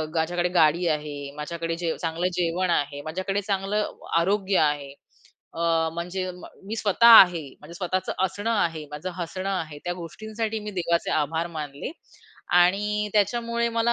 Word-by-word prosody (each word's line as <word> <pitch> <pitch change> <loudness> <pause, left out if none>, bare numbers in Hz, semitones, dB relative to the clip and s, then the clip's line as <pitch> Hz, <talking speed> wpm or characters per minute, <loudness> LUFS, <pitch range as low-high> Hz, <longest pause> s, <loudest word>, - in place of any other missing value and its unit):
माझ्याकडे 175 +2 0
गाडी 170 +1 +4
आहे, 150 -2 -3
माझ्याकडे 165 +2 -4
जे 170 -1 -2
चांगलं 165 +2 -1
जेवण 180 +1 0
आहे, 145 -3 0
माझ्याकडे 185 +5 -2
चांगलं 200 +1 -1 0.3
आरोग्य 195 +2 +2
आहे. 145 -2 +1 0.6
अ, 165 - -6 0.3
म्हणजे 180 +2 -3
म 180 - -12 0.2
मी 220 - -3
स्वतः 220 +2 +3
आहे, 175 -4 +3 0.2
माझ्या 165 +3 -12
स्वतःचं 185 0 -2
असणं 205 +4 -2
आहे, 165 -8 0
माझं 150 +5 -5
हसणं 185 +2 -4
आहे, 160 -6 -3
त्या 175 - -1
गोष्टींसाठी 220 +6 -4
मी 210 0 -6
देवाचे 170 0 0
आभार 160 +2 0
मानले 145 - -5 0.7
आणि 210 +4 +2
त्याच्यामुळे 235 +3 +1
मला 230 +1 +2
175 Hz, 145 wpm, -25 LUFS, 160-205 Hz, 0.7 s, गाडी